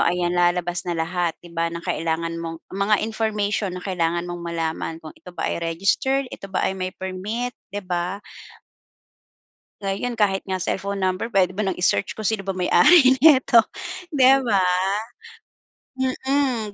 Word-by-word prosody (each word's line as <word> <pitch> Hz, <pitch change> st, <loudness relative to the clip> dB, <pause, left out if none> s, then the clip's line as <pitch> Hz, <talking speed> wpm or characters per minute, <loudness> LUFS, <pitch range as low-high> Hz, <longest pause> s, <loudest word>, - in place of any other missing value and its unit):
ayan, 175 Hz, 0 st, +1 dB
lalabas 175 Hz, 0 st, +1 dB
na 170 Hz, -, -1 dB
lahat 170 Hz, +1 st, -1 dB
'di 170 Hz, -, -12 dB
ba, 165 Hz, 0 st, 0 dB
ng 170 Hz, 0 st, -7 dB
kailangan 165 Hz, +1 st, -1 dB
mong 165 Hz, 0 st, -5 dB
mga 200 Hz, +2 st, +1 dB
information 210 Hz, -3 st, -1 dB
na 180 Hz, -, -7 dB
kailangan 170 Hz, -2 st, -1 dB
mong 175 Hz, 0 st, -6 dB
malaman, 165 Hz, -1 st, -3 dB
kung 155 Hz, -, -9 dB
ito -, -, -16 dB
ba -, -, -1 dB
ay -, -, -3 dB
registered, 195 Hz, +11 st, +1 dB
ito 195 Hz, -, -8 dB
ba 190 Hz, -, -1 dB
ay -, -, +1 dB
may 185 Hz, -1 st, -4 dB
permit, 205 Hz, +7 st, -4 dB, 0.2 s
'di 205 Hz, 0 st, -5 dB
ba? 180 Hz, +1 st, -2 dB, 1.7 s
Ngayon, 200 Hz, +5 st, -2 dB
kahit 200 Hz, -4 st, +1 dB
nga 185 Hz, -2 st, -2 dB
cellphone 200 Hz, +2 st, -2 dB
number 185 Hz, +3 st, 0 dB
puwede 195 Hz, -5 st, +2 dB
mo 215 Hz, -, 0 dB
nang 190 Hz, -, 0 dB
i-search 180 Hz, +1 st, 0 dB
kung 220 Hz, -, -7 dB
sino 205 Hz, -3 st, -1 dB
ba 195 Hz, -, -1 dB
may-ari 260 Hz, -, +5 dB
neto, 265 Hz, -4 st, +6 dB, 0.6 s
'di 265 Hz, -1 st, +6 dB
ba? 200 Hz, -4 st, +3 dB, 1.6 s
Mm, 260 Hz, -7 st, 0 dB
190 Hz, 160 wpm, -23 LUFS, 175-215 Hz, 1.7 s, neto